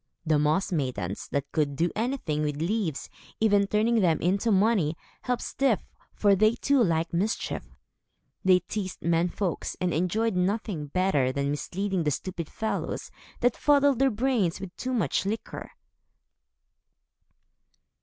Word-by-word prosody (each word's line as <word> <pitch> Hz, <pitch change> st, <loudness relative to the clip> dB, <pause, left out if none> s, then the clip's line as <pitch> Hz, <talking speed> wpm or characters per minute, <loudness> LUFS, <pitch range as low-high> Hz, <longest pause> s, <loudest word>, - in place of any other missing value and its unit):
The 155 Hz, -2 st, +3 dB
Moss 155 Hz, +7 st, +1 dB
Maidens, 130 Hz, -, -2 dB
that 140 Hz, 0 st, -3 dB
could 145 Hz, -3 st, 0 dB
do 170 Hz, +4 st, +1 dB
anything 220 Hz, -, -1 dB
with 150 Hz, -1 st, -1 dB
leaves, 170 Hz, -2 st, -1 dB, 0.3 s
even 205 Hz, -2 st, +3 dB
turning 225 Hz, +3 st, +2 dB
them 170 Hz, -6 st, +3 dB
into 195 Hz, +6 st, +1 dB
money, 190 Hz, -6 st, +2 dB, 0.2 s
helped 250 Hz, -1 st, -2 dB
Styf, 265 Hz, -6 st, +1 dB, 0.4 s
for 205 Hz, -1 st, +4 dB
they 215 Hz, +4 st, +4 dB
too 275 Hz, 0 st, +3 dB
liked 165 Hz, -3 st, 0 dB
mischief. 200 Hz, +6 st, -2 dB, 0.7 s
They 185 Hz, -1 st, +5 dB
teased 190 Hz, 0 st, -5 dB
men 170 Hz, +1 st, +2 dB
folks, 185 Hz, -1 st, -3 dB
and 180 Hz, -2 st, 0 dB
enjoyed 190 Hz, +6 st, 0 dB
nothing 180 Hz, -4 st, -1 dB
better 145 Hz, -5 st, +1 dB
than 140 Hz, +1 st, -1 dB
misleading 190 Hz, +5 st, -2 dB
the 155 Hz, -, +1 dB
stupid 170 Hz, +3 st, -4 dB
fellows 220 Hz, -, -3 dB, 0.3 s
that 245 Hz, -1 st, +3 dB
fuddled 285 Hz, -3 st, +3 dB
their 270 Hz, 0 st, +4 dB
brains 225 Hz, -7 st, 0 dB
with 195 Hz, -1 st, -8 dB
too 255 Hz, -, -4 dB
much 220 Hz, -, +1 dB
liquor. 215 Hz, +3 st, -4 dB
190 Hz, 140 wpm, -27 LUFS, 160-220 Hz, 0.7 s, They